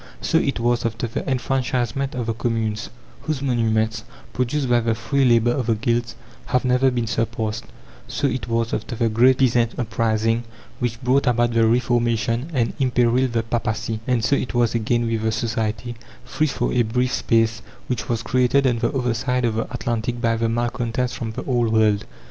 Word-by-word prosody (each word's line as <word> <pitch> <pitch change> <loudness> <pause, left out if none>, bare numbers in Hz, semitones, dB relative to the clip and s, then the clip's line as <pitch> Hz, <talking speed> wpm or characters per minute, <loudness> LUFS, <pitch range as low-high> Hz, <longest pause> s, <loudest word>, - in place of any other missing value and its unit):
So 165 - +2
it 140 -5 -1
was 120 0 +1
after 115 +1 -2
the 115 - -4
enfranchisement 130 0 -1
of 125 -2 -2
the 115 - -1
communes, 115 -2 -2 0.3
whose 150 -3 -3
monuments, 110 -3 0 0.3
produced 130 +3 -1
by 120 -1 +4
the 115 -1 0
free 135 +5 0
labour 120 -1 +4
of 125 -2 -2
the 115 - +3
guilds, 120 +2 -1 0.3
have 125 +1 +1
never 125 +1 +3
been 120 -2 -1
surpassed; 115 -1 -2 0.4
so - - -2
it 125 -4 -1
was 115 0 -1
after 120 - -3
the 115 0 +1
great 125 +4 +4
peasant 120 -3 +2
uprising 115 0 0 0.4
which 120 -2 -2
brought 130 +2 +2
about 120 -1 +2
the 115 -1 +4
Reformation 120 +2 +1
and 120 -6 0
imperilled 125 -1 +2
the 115 -1 +1
papacy; 110 -1 -2
and 120 -3 +1
so 140 - +3
it 125 - -3
was 120 -2 +2
again 120 +1 +1
with 115 -1 -1
the 110 0 0
society, 110 +1 -2 0.3
free 155 +5 0
for 135 - -1
a 125 - +3
brief 125 +3 0
space, 115 -1 +1 0.2
which 125 -2 -3
was 115 -1 -1
created 130 +3 +2
on 120 -3 +2
the - - +1
other 125 -2 0
side 125 +1 0
of 115 - +1
the 115 +1 -3
Atlantic 120 -1 -2
by 115 -1 +1
the 115 0 0
malcontents 120 +1 -1
from 115 -2 -5
the - - -5
Old 120 -4 +1
world. 110 -2 +3
120 Hz, 190 wpm, -22 LUFS, 115-125 Hz, 0.4 s, by